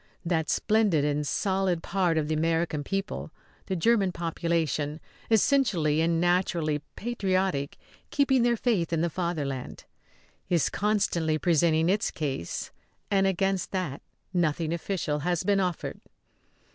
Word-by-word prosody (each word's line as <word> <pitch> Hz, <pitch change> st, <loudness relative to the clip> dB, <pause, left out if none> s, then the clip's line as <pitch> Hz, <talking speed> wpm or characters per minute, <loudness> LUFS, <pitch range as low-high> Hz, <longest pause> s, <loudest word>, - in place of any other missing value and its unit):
That 165 Hz, -2 st, 0 dB
splendid 210 Hz, -9 st, +2 dB
and 150 Hz, 0 st, 0 dB
solid 190 Hz, -2 st, 0 dB
part 180 Hz, -3 st, +1 dB
of 155 Hz, -1 st, 0 dB
the 155 Hz, -, 0 dB
American 160 Hz, -1 st, 0 dB
people, 195 Hz, +5 st, -3 dB, 0.4 s
the 190 Hz, -, -1 dB
German 195 Hz, +1 st, +3 dB
population, 165 Hz, -3 st, -1 dB, 0.3 s
essentially 200 Hz, -, +3 dB
and 165 Hz, 0 st, +2 dB
naturally 175 Hz, -4 st, +1 dB
patriotic, 190 Hz, -10 st, -1 dB, 0.3 s
keeping 270 Hz, -3 st, +3 dB
their 235 Hz, 0 st, +3 dB
faith 210 Hz, -9 st, 0 dB
in 165 Hz, -1 st, +1 dB
the 170 Hz, 0 st, 0 dB
Fatherland, 150 Hz, -7 st, -3 dB, 0.7 s
is 170 Hz, -5 st, +2 dB
constantly 175 Hz, -6 st, +1 dB
presenting 160 Hz, 0 st, +3 dB
its 200 Hz, +3 st, +2 dB
case; 135 Hz, -, -4 dB, 0.4 s
and 195 Hz, -1 st, +3 dB
against 195 Hz, -1 st, 0 dB
that 180 Hz, -8 st, -2 dB, 0.3 s
nothing 165 Hz, -2 st, 0 dB
official 170 Hz, -3 st, -2 dB
has 175 Hz, +2 st, 0 dB
been 200 Hz, -1 st, +2 dB
offered. 180 Hz, -3 st, -2 dB
170 Hz, 125 wpm, -27 LUFS, 155-195 Hz, 0.7 s, German